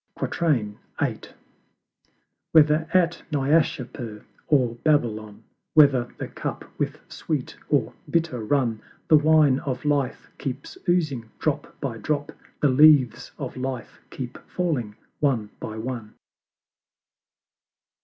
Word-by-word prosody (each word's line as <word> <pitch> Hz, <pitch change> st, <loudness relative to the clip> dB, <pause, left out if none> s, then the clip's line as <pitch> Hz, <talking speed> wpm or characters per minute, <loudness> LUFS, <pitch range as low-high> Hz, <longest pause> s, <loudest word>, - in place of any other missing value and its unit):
VIII. 120 Hz, -, 0 dB, 1.7 s
Whether 155 Hz, 0 st, +5 dB
at 175 Hz, -1 st, +2 dB
Naishapur 135 Hz, -6 st, 0 dB, 0.2 s
or 130 Hz, -6 st, +3 dB
Babylon, 110 Hz, -9 st, 0 dB, 0.3 s
Whether 140 Hz, -5 st, +6 dB
the -, -, -4 dB
Cup -, -, -5 dB
with -, -, -2 dB
sweet -, -, -4 dB
or -, -, +1 dB, 0.2 s
bitter 160 Hz, -9 st, 0 dB
run, 115 Hz, -3 st, +1 dB, 0.3 s
The 155 Hz, -, +8 dB
Wine 150 Hz, -3 st, +5 dB
of 130 Hz, 0 st, -4 dB
Life 145 Hz, -3 st, 0 dB
keeps 135 Hz, 0 st, -5 dB
oozing 150 Hz, -10 st, +1 dB
drop 150 Hz, -1 st, -2 dB
by 125 Hz, -5 st, -4 dB
drop, 145 Hz, +4 st, -2 dB, 0.3 s
The 145 Hz, -, +4 dB
Leaves 140 Hz, -2 st, +5 dB
of -, -, -5 dB
Life 130 Hz, -1 st, -5 dB
keep 125 Hz, -2 st, -7 dB
falling 140 Hz, -13 st, -1 dB, 0.2 s
one 120 Hz, -8 st, +1 dB
by 110 Hz, -, -6 dB
one. 115 Hz, -2 st, -5 dB
135 Hz, 105 wpm, -25 LUFS, 120-150 Hz, 1.7 s, The